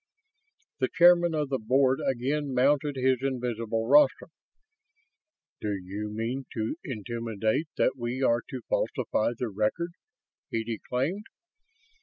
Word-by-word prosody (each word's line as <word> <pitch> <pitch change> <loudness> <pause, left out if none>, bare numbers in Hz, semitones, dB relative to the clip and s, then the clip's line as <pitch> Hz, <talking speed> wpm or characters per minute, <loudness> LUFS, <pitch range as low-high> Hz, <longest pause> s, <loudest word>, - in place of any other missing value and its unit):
The 130 - +2
Chairman 175 -1 +5
of 150 -2 -1
the 135 -1 -1
Board 130 +3 +2
again 135 +2 -1
mounted 140 +2 +2
his 130 -1 +2
invisible 115 -4 -2
rostrum. 145 +3 +4 1.3
"Do 105 -1 -2
you 100 +3 -5
mean 120 +5 -3
to 110 +4 -2
intimate 115 - -2
that - - +2
we 120 +2 -3
are 120 -1 +3
to 130 - -5
falsify 110 +2 0
the 125 -1 -2
record?" 110 - -1 0.6
he 115 - -1
declaimed. 125 - -3
125 Hz, 120 wpm, -28 LUFS, 115-140 Hz, 1.3 s, Chairman